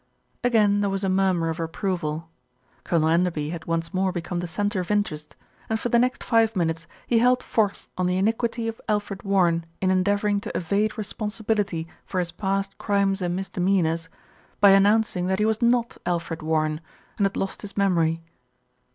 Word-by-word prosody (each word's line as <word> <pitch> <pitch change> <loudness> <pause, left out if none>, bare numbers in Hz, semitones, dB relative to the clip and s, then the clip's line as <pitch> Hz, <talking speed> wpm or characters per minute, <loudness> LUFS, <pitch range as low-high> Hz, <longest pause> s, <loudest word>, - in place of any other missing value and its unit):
Again 210 -4 +3
there 200 - +1
was 195 0 -2
a 195 - +1
murmur 185 -3 +2
of 165 +2 -4
approval. 165 -2 -2 0.6
Colonel 160 -2 +1
Enderby 165 -3 +1
had 170 -2 -6
once 165 +1 -2
more 190 0 +1
become 175 0 -3
the 175 - -3
centre 205 +3 -1
of 180 - -4
interest, 205 -8 -1 0.3
and 220 0 0
for 240 - -2
the 235 - +4
next 250 +1 0
five 225 -2 +3
minutes 165 -2 -1 0.2
he 235 - +3
held 250 +1 +3
forth 210 -3 0
on 180 - +2
the 180 0 +1
iniquity 225 +3 0
of 225 0 -5
Alfred 205 -2 -1
Warren 175 -4 +2 0.2
in 185 -1 +2
endeavouring 200 +2 +2
to - - -4
evade 205 +6 0
responsibility 210 -4 -2 0.2
for 190 - -6
his 175 -2 0
past 195 +2 -2
crimes 200 -2 +1
and 175 -1 -1
misdemeanours, 180 -3 0 0.5
by 200 -1 +7
announcing 195 -2 +3
that 190 0 +1
he 210 - +2
was 220 +1 0
not 235 0 +2
Alfred 170 -1 -2
Warren, 155 0 0 0.4
and 200 - +4
had 195 - -1
lost 195 - -3
his 205 -1 -8
memory. 165 -4 +2
195 Hz, 175 wpm, -25 LUFS, 170-210 Hz, 0.6 s, by